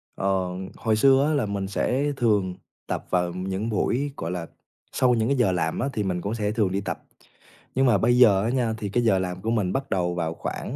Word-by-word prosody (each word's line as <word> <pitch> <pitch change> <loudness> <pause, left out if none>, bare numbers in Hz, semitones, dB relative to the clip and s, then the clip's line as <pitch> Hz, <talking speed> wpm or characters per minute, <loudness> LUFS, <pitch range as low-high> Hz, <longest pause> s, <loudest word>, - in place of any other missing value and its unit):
Ờ, 95 -2 0 0.3
hồi 110 -1 0
xưa 135 +4 +5
á 155 - +1
là 140 -7 +1
mình 100 -1 -3
sẽ 135 +8 0
thường 105 -6 +1 0.3
tập - - -3
vào 90 -1 0
những 95 +4 -3
buổi, 125 +6 0
gọi 85 +2 -4
là, 85 -2 -4 0.4
sau 125 -1 +3
những 115 -1 +1
cái 140 -1 +1
giờ 120 -6 +3
làm 80 -3 -1
á, 135 - 0
thì 105 - -1
mình 90 -2 -2
cũng 100 - -3
sẽ 105 -2 -1
thường 105 -4 +1
đi 100 +1 -1
tập. - - -5 0.7
Nhưng 135 +1 +3
mà 120 -5 +4
bây 120 +5 +3
giờ 100 -6 +6
á 115 - 0
nha 120 -3 0
thì 105 -2 -4
cái 120 +4 +1
giờ 100 -5 +3
làm 90 0 -4
của 115 - -1
mình 105 -6 0
bắt 135 +1 -2
đầu 90 -2 0
vào 80 -2 -2
khoảng, - - -5
105 Hz, 240 wpm, -25 LUFS, 95-120 Hz, 0.7 s, giờ